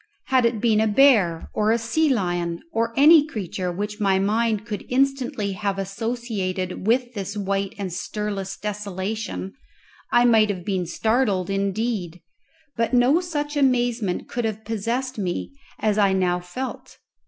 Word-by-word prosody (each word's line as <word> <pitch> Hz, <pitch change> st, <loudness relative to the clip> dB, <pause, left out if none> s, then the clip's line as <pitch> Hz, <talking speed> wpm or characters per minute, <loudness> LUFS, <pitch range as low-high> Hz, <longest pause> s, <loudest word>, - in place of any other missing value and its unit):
Had 255 Hz, -3 st, +4 dB
it 230 Hz, -2 st, -2 dB
been 220 Hz, -1 st, +3 dB
a 220 Hz, -, +2 dB
bear, 210 Hz, -8 st, +4 dB
or 215 Hz, 0 st, +1 dB
a 225 Hz, -, +4 dB
sea 265 Hz, +8 st, +1 dB
lion, 175 Hz, -6 st, -1 dB
or 230 Hz, +1 st, 0 dB
any 300 Hz, +2 st, +8 dB
creature 185 Hz, -, -4 dB
which 210 Hz, +4 st, -4 dB
my 195 Hz, -2 st, +3 dB
mind 215 Hz, +2 st, +1 dB
could 215 Hz, -3 st, -5 dB
instantly 255 Hz, -5 st, 0 dB
have 200 Hz, 0 st, -2 dB
associated 195 Hz, -3 st, -3 dB
with 245 Hz, +1 st, +2 dB
this 200 Hz, -1 st, -5 dB
white 195 Hz, 0 st, -2 dB
and 190 Hz, -4 st, -4 dB
stirless 195 Hz, 0 st, -4 dB
desolation, 210 Hz, -1 st, -4 dB, 0.6 s
I 240 Hz, 0 st, +5 dB
might 220 Hz, -3 st, +5 dB
have 185 Hz, -4 st, -4 dB
been 185 Hz, -3 st, -1 dB
startled 215 Hz, -5 st, 0 dB
indeed; 195 Hz, -2 st, -2 dB, 0.6 s
but 230 Hz, +2 st, 0 dB
no 250 Hz, +7 st, +4 dB
such 295 Hz, -4 st, -3 dB
amazement 245 Hz, -8 st, +1 dB
could 240 Hz, -, -3 dB
have 220 Hz, 0 st, -4 dB
possessed 230 Hz, +3 st, -2 dB
me 180 Hz, +4 st, -3 dB, 0.3 s
as 215 Hz, -1 st, +1 dB
I 200 Hz, -2 st, +4 dB
now 180 Hz, -2 st, +1 dB
felt. 215 Hz, +10 st, -7 dB
210 Hz, 150 wpm, -23 LUFS, 195-240 Hz, 0.6 s, any